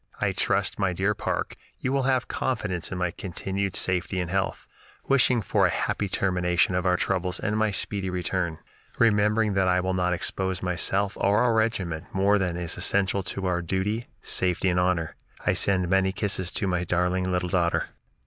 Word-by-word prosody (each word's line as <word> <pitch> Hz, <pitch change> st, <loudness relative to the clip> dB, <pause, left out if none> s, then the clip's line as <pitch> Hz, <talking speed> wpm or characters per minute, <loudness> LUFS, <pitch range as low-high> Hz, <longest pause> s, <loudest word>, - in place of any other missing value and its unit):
I -, -, +1 dB
trust, -, -, 0 dB
my 95 Hz, -2 st, +1 dB
dear 95 Hz, +4 st, +1 dB
Parke, -, -, -3 dB, 0.2 s
you 130 Hz, -, -2 dB
will 140 Hz, -, +2 dB
have 130 Hz, -1 st, +1 dB
confidence 100 Hz, -9 st, -2 dB
in 95 Hz, -, -3 dB
my 90 Hz, -1 st, 0 dB
continued 95 Hz, +2 st, -3 dB
safety 90 Hz, +1 st, 0 dB
and 90 Hz, -1 st, -3 dB
health, 95 Hz, 0 st, -1 dB, 0.4 s
wishing 130 Hz, -4 st, +3 dB
for -, -, +3 dB
a -, -, -1 dB
happy 100 Hz, -, -1 dB
termination 90 Hz, -1 st, +1 dB
of 90 Hz, 0 st, 0 dB
our 90 Hz, 0 st, +3 dB
troubles 90 Hz, -1 st, -1 dB
and 105 Hz, -, -1 dB
my 110 Hz, 0 st, +2 dB
speedy 100 Hz, -1 st, -2 dB
return, 90 Hz, -2 st, -2 dB, 0.4 s
remembering 105 Hz, -1 st, +3 dB
that 95 Hz, -1 st, +2 dB
I 90 Hz, 0 st, +3 dB
will 95 Hz, +1 st, -1 dB
not 90 Hz, -1 st, +1 dB
expose 95 Hz, +1 st, -1 dB
myself 95 Hz, +3 st, 0 dB
or 100 Hz, +4 st, +3 dB
our 120 Hz, -2 st, +3 dB
regiment 95 Hz, -7 st, 0 dB
more 100 Hz, +2 st, +3 dB
than 90 Hz, -2 st, -1 dB
is 85 Hz, -2 st, -2 dB
essential 100 Hz, 0 st, +1 dB
to 95 Hz, +1 st, -4 dB
our 90 Hz, -1 st, 0 dB
duty, 95 Hz, +7 st, -2 dB, 0.2 s
safety, 90 Hz, +1 st, +1 dB
and 90 Hz, 0 st, +1 dB
honor. 90 Hz, -3 st, 0 dB, 0.3 s
I -, -, +3 dB
send 95 Hz, -2 st, +2 dB
many 95 Hz, +1 st, +2 dB
kisses 95 Hz, -3 st, -1 dB
to -, -, -1 dB
my 90 Hz, -2 st, 0 dB
darling 90 Hz, +1 st, 0 dB
little 90 Hz, 0 st, -1 dB
daughter." 85 Hz, -2 st, +1 dB
95 Hz, 185 wpm, -26 LUFS, 90-100 Hz, 0.4 s, wishing